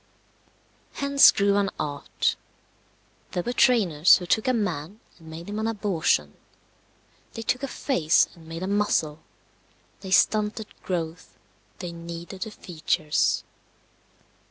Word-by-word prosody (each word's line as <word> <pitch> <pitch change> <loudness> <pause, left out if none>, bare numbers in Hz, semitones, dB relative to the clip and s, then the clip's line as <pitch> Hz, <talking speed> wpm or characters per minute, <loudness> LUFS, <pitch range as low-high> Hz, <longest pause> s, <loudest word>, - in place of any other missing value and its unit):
Hence 280 0 +6
grew 200 0 +2
an 200 -1 +1
art. 145 -1 -2 1.0
There 175 - -1
were 245 - -3
trainers 185 - +5
who 180 - -7
took 220 +7 +1
a - - +4
man 195 -4 -3 0.2
and 165 - -16
made 165 +2 -9
him 205 +1 -4
an 220 - -1
abortion; 185 - 0 1.0
they 225 - -6
took 250 - -1
a 275 - -2
face 180 - +2
and 165 -3 -17
made 165 +2 -6
a - - -2
muzzle; 195 -7 0 0.8
they 190 - -9
stunted 210 +3 +2 0.2
growth; 165 -2 -5 0.4
they 175 - -6
kneaded 170 +2 -8
the 220 - -3
features. 155 -6 -1
185 Hz, 130 wpm, -25 LUFS, 165-215 Hz, 1.0 s, Hence